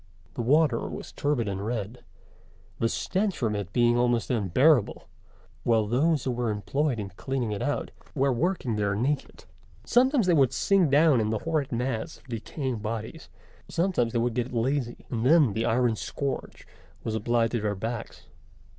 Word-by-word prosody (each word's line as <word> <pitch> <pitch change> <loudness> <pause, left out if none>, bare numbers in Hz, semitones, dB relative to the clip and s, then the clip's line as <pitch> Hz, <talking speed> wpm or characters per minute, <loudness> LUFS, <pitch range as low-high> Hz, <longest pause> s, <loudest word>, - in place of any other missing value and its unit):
The - - -3
water 140 0 +2
was - - -7
turbid 145 -6 -1
and 100 0 -3
red, 110 +1 -4 0.8
the 115 - +2
stench 190 - -1
from 110 -4 0
it 100 -3 -4
being 120 +2 +3
almost 120 -1 +1
unbearable, 120 - +2 0.6
while 115 -2 +3
those 140 +6 +1
who 130 - -1
were 120 -1 -1
employed 130 +6 -1
in 100 -2 -4
cleaning 125 +3 -3
it 100 - -3
out 145 - -2 0.2
were 135 -1 +2
working 130 - -1
there 100 -1 0
naked. 135 +7 -2 0.4
Sometimes 255 -1 +3
they 180 - +3
would 135 -6 +4
sink 195 -5 +3
down 145 -3 +5
in 110 - 0
the 110 - 0
horrid 155 -4 -1
mass 120 -1 -2
of - - -24
decaying 120 +2 -4
bodies: 110 +9 -5 0.4
sometimes 170 -10 0
they 120 - -1
would 120 0 0
get 125 +2 -2
lazy, 125 +1 -1
and 115 -2 -1
then 145 -4 +5
the 110 +2 -1
iron 120 0 +2
scourge 135 +5 -4 0.4
was 110 - -3
applied 115 +1 +1
to 120 - -1
their 105 -1 -1
backs. 115 +4 -5
120 Hz, 170 wpm, -27 LUFS, 110-145 Hz, 0.8 s, down